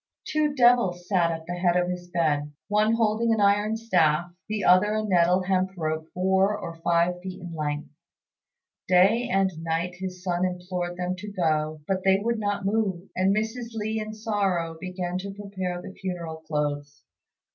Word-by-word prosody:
Two 300 Hz, -1 st, 0 dB
devils 240 Hz, -9 st, +3 dB
sat 180 Hz, -4 st, +3 dB
at 160 Hz, -1 st, -4 dB
the 175 Hz, -, -4 dB
head 175 Hz, 0 st, +2 dB
of 180 Hz, 0 st, +1 dB
his 180 Hz, 0 st, -5 dB
bed, 150 Hz, -4 st, 0 dB, 0.2 s
one 210 Hz, +2 st, +3 dB
holding 225 Hz, 0 st, +2 dB
an 225 Hz, -, +2 dB
iron 205 Hz, +2 st, +3 dB
staff, 175 Hz, -7 st, +2 dB, 0.2 s
the 215 Hz, -1 st, -2 dB
other 185 Hz, +4 st, +5 dB
a 215 Hz, -, 0 dB
nettle 180 Hz, -2 st, +3 dB
hemp 190 Hz, 0 st, 0 dB
rope 155 Hz, -1 st, -2 dB
four 190 Hz, +3 st, +2 dB
or 175 Hz, -5 st, -6 dB
five 170 Hz, +1 st, +1 dB
feet 185 Hz, 0 st, -7 dB
in 175 Hz, -2 st, -8 dB
length. 150 Hz, -1 st, -3 dB, 1.0 s
Day 200 Hz, +7 st, +4 dB
and 195 Hz, 0 st, +2 dB
night 165 Hz, +2 st, -2 dB
his 185 Hz, -1 st, -6 dB
son 175 Hz, -1 st, 0 dB
implored 180 Hz, -1 st, -3 dB
them 180 Hz, 0 st, -2 dB
to 205 Hz, +2 st, -7 dB
go, 155 Hz, -4 st, 0 dB
but 190 Hz, -1 st, -1 dB
they 190 Hz, 0 st, +5 dB
would 230 Hz, +3 st, -1 dB
not 205 Hz, -1 st, -2 dB
move; 195 Hz, -3 st, -1 dB
and 190 Hz, +1 st, +3 dB
Mrs. 225 Hz, +2 st, -3 dB
Li 220 Hz, 0 st, -2 dB
in 215 Hz, 0 st, -4 dB
sorrow 195 Hz, -7 st, -1 dB
began 180 Hz, 0 st, -3 dB
to 195 Hz, +1 st, -6 dB
prepare 190 Hz, -3 st, -4 dB
the 190 Hz, -, -8 dB
funeral 175 Hz, -5 st, -5 dB
clothes. 145 Hz, -2 st, -3 dB
185 Hz, 175 wpm, -26 LUFS, 175-205 Hz, 1.0 s, other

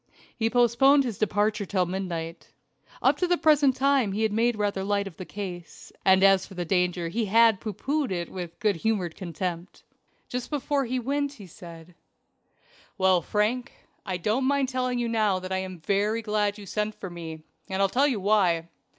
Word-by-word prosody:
He 225 Hz, -2 st, 0 dB
postponed 245 Hz, +4 st, +4 dB
his 235 Hz, -7 st, -4 dB
departure 210 Hz, 0 st, +1 dB
till 185 Hz, -1 st, 0 dB
midnight. 175 Hz, -3 st, -5 dB, 0.5 s
Up -, -, +4 dB
to 360 Hz, -, 0 dB
the 355 Hz, 0 st, +2 dB
present 295 Hz, -5 st, +4 dB
time 270 Hz, -6 st, +2 dB
he 215 Hz, +2 st, -1 dB
had 220 Hz, -2 st, +1 dB
made 235 Hz, +2 st, +2 dB
rather 205 Hz, -2 st, -1 dB
light 200 Hz, 0 st, 0 dB
of 190 Hz, -5 st, -9 dB
the 185 Hz, -, -7 dB
case, 180 Hz, -4 st, -8 dB
and 190 Hz, 0 st, +5 dB
as 195 Hz, -1 st, +5 dB
for 195 Hz, -, -13 dB
danger 180 Hz, -1 st, 0 dB
he 225 Hz, +5 st, -1 dB
had 225 Hz, 0 st, +4 dB
pooh 220 Hz, -, -3 dB
poohed 285 Hz, -1 st, -2 dB
it 175 Hz, -2 st, -3 dB
with 175 Hz, -3 st, -7 dB
good 210 Hz, -6 st, +1 dB
humored 185 Hz, -3 st, -1 dB
contempt. 175 Hz, 0 st, -5 dB, 0.4 s
Just 250 Hz, -1 st, -4 dB
before 285 Hz, -1 st, -1 dB
he 255 Hz, +2 st, -2 dB
went 280 Hz, +3 st, -1 dB
he 210 Hz, -8 st, -12 dB
said: 170 Hz, -1 st, -12 dB, 1.0 s
"Well, 185 Hz, -2 st, +3 dB
Frank, 215 Hz, +8 st, -1 dB, 0.3 s
I 185 Hz, -1 st, -3 dB
don't 215 Hz, +9 st, 0 dB
mind 275 Hz, -1 st, +1 dB
telling 255 Hz, -1 st, -1 dB
you 240 Hz, -1 st, -1 dB
now 215 Hz, -4 st, +1 dB
that 185 Hz, 0 st, -7 dB
I 190 Hz, -, 0 dB
am 185 Hz, -3 st, -7 dB
very 210 Hz, +5 st, 0 dB
glad 210 Hz, -1 st, 0 dB
you 205 Hz, -, -10 dB
sent 210 Hz, +2 st, -2 dB
for 190 Hz, -, -8 dB
me, 160 Hz, -2 st, -8 dB, 0.3 s
and 190 Hz, 0 st, -2 dB
I'll 195 Hz, -, +4 dB
tell 265 Hz, +8 st, +2 dB
you 250 Hz, -7 st, -1 dB
why. 185 Hz, -5 st, +2 dB
205 Hz, 190 wpm, -26 LUFS, 185-240 Hz, 1.0 s, and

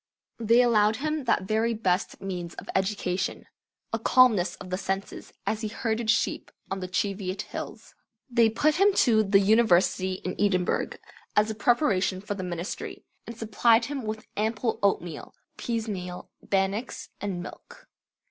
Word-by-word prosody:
They 230 Hz, +2 st, +5 dB
allowed 215 Hz, -3 st, +4 dB
him 305 Hz, +2 st, -2 dB
that 230 Hz, -, +2 dB
very 220 Hz, +4 st, 0 dB
best 185 Hz, -4 st, -1 dB
means 180 Hz, -3 st, -5 dB
of -, -, -9 dB
education, 190 Hz, -1 st, -1 dB, 0.5 s
a 225 Hz, -, 0 dB
calmness 225 Hz, -6 st, +4 dB
of 185 Hz, -, -10 dB
the 185 Hz, -, 0 dB
senses, 195 Hz, 0 st, -4 dB
as 220 Hz, 0 st, -1 dB
he 220 Hz, -, -2 dB
herded 225 Hz, +1 st, -2 dB
sheep 235 Hz, -, +1 dB, 0.2 s
on 195 Hz, -, -2 dB
the 185 Hz, -, -4 dB
Cheviot 195 Hz, +1 st, -2 dB
Hills. -, -, -8 dB, 0.3 s
They 235 Hz, -3 st, +4 dB
put 295 Hz, +8 st, +2 dB
him 400 Hz, +2 st, +5 dB
to 220 Hz, -4 st, +4 dB
the 200 Hz, -1 st, +4 dB
University 195 Hz, -3 st, +3 dB
in 185 Hz, 0 st, -5 dB
Edinburgh, 185 Hz, -3 st, +1 dB, 0.4 s
as 210 Hz, +1 st, +3 dB
a -, -, -3 dB
preparation 210 Hz, -5 st, +2 dB
for 205 Hz, +1 st, -4 dB
the 200 Hz, -, -5 dB
ministry, 175 Hz, 0 st, -5 dB, 0.2 s
and 235 Hz, -, -8 dB
supplied 225 Hz, +1 st, +3 dB
him 280 Hz, 0 st, -4 dB
with 215 Hz, -1 st, -5 dB
ample 220 Hz, +2 st, -1 dB
oatmeal, 175 Hz, -6 st, -1 dB, 0.2 s
peasemeal 205 Hz, -6 st, -4 dB, 0.2 s
bannocks, 195 Hz, +5 st, -1 dB
and 185 Hz, -4 st, -3 dB
milk. -, -, -12 dB
210 Hz, 150 wpm, -27 LUFS, 190-230 Hz, 0.5 s, They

